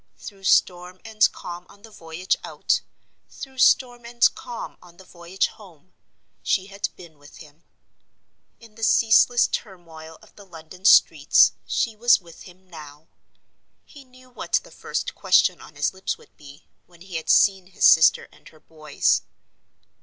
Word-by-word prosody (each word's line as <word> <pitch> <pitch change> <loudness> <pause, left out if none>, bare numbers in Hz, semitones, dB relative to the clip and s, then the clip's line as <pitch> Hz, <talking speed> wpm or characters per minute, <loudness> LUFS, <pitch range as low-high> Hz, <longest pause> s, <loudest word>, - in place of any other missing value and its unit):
Through 195 -2 -12
storm 180 0 +1
and 220 -1 +2
calm 175 0 -10
on 200 - -20
the 225 - -15
voyage 165 -1 -4
out, - - -2 0.5
through 265 -1 -11
storm 245 -2 +2
and 235 0 +2
calm 240 -2 -9
on 175 -1 -19
the 190 - -15
voyage 175 +2 -3
home, 185 -4 -14 0.5
she 190 - -1
had 200 0 -5
been 160 -4 -16
with 145 0 -17
him. 155 +1 -17 1.0
In 230 -2 -18
the 225 - -16
ceaseless 230 +2 +3
turmoil 160 -5 -8
of - - -22
the 205 - -15
London 180 0 -15
streets, - - +5 0.2
she 230 -2 -2
was 235 +2 +3
with 170 -3 -16
him 185 +1 -22
now. 150 -3 -14 0.8
He 285 -3 -16
knew 255 0 -21
what - - -10
the - - -18
first - - -5
question - - +1
on - - -15
his - - -2
lips 190 0 -5
would - - -23
be, 145 0 -16 0.2
when 175 -1 -23
he 185 -2 -7
had 160 - -8
seen 195 -2 +3
his 185 - -1
sister 160 - +5
and - - -19
her 155 - -22
boys. 155 -2 -1
185 Hz, 160 wpm, -22 LUFS, 165-220 Hz, 1.0 s, streets